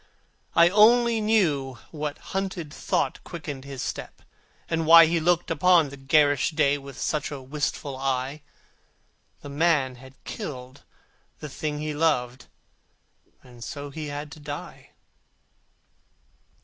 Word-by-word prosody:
I 170 Hz, +1 st, +7 dB
only 230 Hz, +3 st, +5 dB
knew 155 Hz, -, +1 dB
what 150 Hz, -2 st, -4 dB, 0.2 s
haunted 190 Hz, -5 st, -3 dB
thought -, -, -1 dB
Quickened 145 Hz, -6 st, -7 dB
his 135 Hz, -2 st, -6 dB
step, -, -, -6 dB, 0.4 s
and 165 Hz, -1 st, -1 dB
why 165 Hz, 0 st, +10 dB
He 165 Hz, +1 st, +1 dB
looked 175 Hz, +1 st, +1 dB
upon 165 Hz, -1 st, +4 dB
the 140 Hz, -, -9 dB
garish 145 Hz, +1 st, +3 dB
day 145 Hz, -3 st, +1 dB
With 140 Hz, -1 st, -11 dB
such 150 Hz, -2 st, -1 dB
a 145 Hz, -, -6 dB
wistful 140 Hz, 0 st, -3 dB
eye; 135 Hz, +2 st, -2 dB, 1.0 s
The 145 Hz, -, -9 dB
man 140 Hz, -4 st, +1 dB
had 130 Hz, +1 st, -14 dB
killed 130 Hz, -1 st, -7 dB, 0.6 s
the 150 Hz, -, -8 dB
thing 150 Hz, +2 st, -4 dB
he 150 Hz, 0 st, -3 dB
loved, 130 Hz, -5 st, 0 dB, 1.0 s
And 120 Hz, -2 st, -13 dB
so 145 Hz, -2 st, -7 dB
he 155 Hz, +1 st, -6 dB
had 145 Hz, +1 st, -6 dB
to 160 Hz, -, -11 dB
die. 145 Hz, -1 st, -8 dB
150 Hz, 130 wpm, -25 LUFS, 135-165 Hz, 1.0 s, why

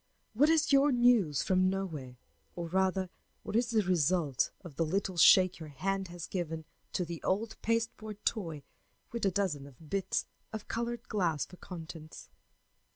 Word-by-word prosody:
What 285 Hz, +8 st, +4 dB
is 320 Hz, -3 st, +3 dB
your 280 Hz, +1 st, +6 dB
News 240 Hz, -, +4 dB
from 185 Hz, 0 st, +3 dB
Nowhere, 160 Hz, -10 st, -4 dB, 0.4 s
or, 170 Hz, -1 st, -4 dB
rather, 190 Hz, 0 st, +1 dB, 0.3 s
what -, -, -5 dB
is 235 Hz, +1 st, +2 dB
the 220 Hz, -3 st, +3 dB
result 170 Hz, -5 st, +2 dB
of 175 Hz, -7 st, -11 dB
the 165 Hz, -, +1 dB
little 190 Hz, +3 st, -1 dB
shake 185 Hz, +2 st, +6 dB
your 160 Hz, -2 st, -8 dB
hand 195 Hz, +6 st, -2 dB
has 175 Hz, -1 st, -7 dB
given 165 Hz, -3 st, -4 dB, 0.3 s
to 180 Hz, -, 0 dB
the 170 Hz, -1 st, -6 dB
old 220 Hz, +4 st, -1 dB
pasteboard 220 Hz, -2 st, -2 dB
toy 165 Hz, -10 st, -1 dB, 0.5 s
with 235 Hz, -4 st, 0 dB
a -, -, +2 dB
dozen 150 Hz, -8 st, -2 dB
bits 190 Hz, +5 st, -1 dB, 0.3 s
of 220 Hz, -1 st, -6 dB
colored 235 Hz, 0 st, -3 dB
glass 165 Hz, -, 0 dB
for 180 Hz, -, -14 dB
contents? 160 Hz, -3 st, -9 dB
185 Hz, 155 wpm, -32 LUFS, 165-215 Hz, 0.5 s, your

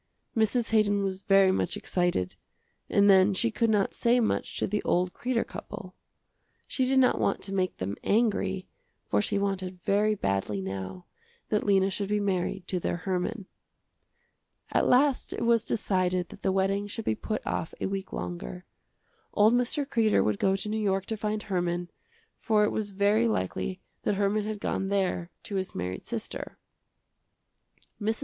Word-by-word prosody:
Mrs. 225 Hz, +1 st, +1 dB
Haydon 205 Hz, -2 st, +3 dB
was 190 Hz, -1 st, -2 dB
very 195 Hz, -1 st, +5 dB
much -, -, -1 dB
excited, 175 Hz, -, 0 dB, 0.6 s
and 200 Hz, 0 st, +4 dB
then 195 Hz, 0 st, +6 dB
she 230 Hz, +4 st, +1 dB
could 225 Hz, +1 st, +1 dB
not 205 Hz, -3 st, +2 dB
say 240 Hz, +1 st, +3 dB
much 225 Hz, -, -1 dB
to -, -, +1 dB
the 210 Hz, +1 st, -1 dB
old 180 Hz, 0 st, +1 dB
Kreder 245 Hz, -2 st, -1 dB
couple. -, -, -8 dB, 0.7 s
She 260 Hz, -, 0 dB
did 265 Hz, +1 st, +2 dB
not 260 Hz, -1 st, +4 dB
want -, -, 0 dB
to 195 Hz, -, -4 dB
make 185 Hz, -2 st, 0 dB
them 95 Hz, +2 st, -3 dB
angry, 200 Hz, -4 st, +1 dB, 0.4 s
for -, -, +1 dB
she 205 Hz, 0 st, 0 dB
wanted 190 Hz, -2 st, -2 dB
very 210 Hz, +3 st, +2 dB
badly 100 Hz, -, -1 dB
now 95 Hz, -1 st, -5 dB, 0.4 s
that 210 Hz, -, 0 dB
Lena 195 Hz, -1 st, +4 dB
should 200 Hz, +1 st, -2 dB
be 210 Hz, 0 st, +1 dB
married 190 Hz, -1 st, -1 dB
to 185 Hz, -, 0 dB
their 175 Hz, -, -1 dB
Herman. 190 Hz, +4 st, -2 dB, 1.3 s
At -, -, +2 dB
last 270 Hz, +1 st, +3 dB
it -, -, -3 dB
was 230 Hz, -1 st, +4 dB
decided 185 Hz, -5 st, 0 dB
that -, -, -12 dB
the 190 Hz, -, +1 dB
wedding 195 Hz, +1 st, +1 dB
should 225 Hz, +2 st, -6 dB
be -, -, +2 dB
put 215 Hz, -, -4 dB
off 160 Hz, -, -3 dB
a -, -, -2 dB
week 195 Hz, 0 st, -3 dB
longer. 60 Hz, -9 st, -5 dB, 0.7 s
Old 215 Hz, +2 st, +5 dB
Mr. 250 Hz, +4 st, +1 dB
Kreder 225 Hz, -5 st, +3 dB
would 105 Hz, -2 st, 0 dB
go 190 Hz, 0 st, +3 dB
to 195 Hz, +2 st, -4 dB
New 215 Hz, +1 st, -1 dB
York 195 Hz, -2 st, +1 dB
to 220 Hz, -, -2 dB
find 215 Hz, 0 st, -2 dB
Herman, 175 Hz, -2 st, -2 dB, 0.5 s
for 215 Hz, -2 st, +3 dB
it 210 Hz, -, +2 dB
was 215 Hz, -2 st, -2 dB
very 205 Hz, +4 st, +2 dB
likely 185 Hz, -, -2 dB, 0.2 s
that 205 Hz, -, 0 dB
Herman 205 Hz, +1 st, +1 dB
had 215 Hz, -1 st, -4 dB
gone 195 Hz, -, -1 dB
there 190 Hz, -3 st, 0 dB
to 200 Hz, -, -3 dB
his 190 Hz, 0 st, -3 dB
married 90 Hz, +1 st, -4 dB
sister. -, -, -5 dB, 1.4 s
Mrs. 220 Hz, +2 st, 0 dB
195 Hz, 170 wpm, -28 LUFS, 185-215 Hz, 1.4 s, then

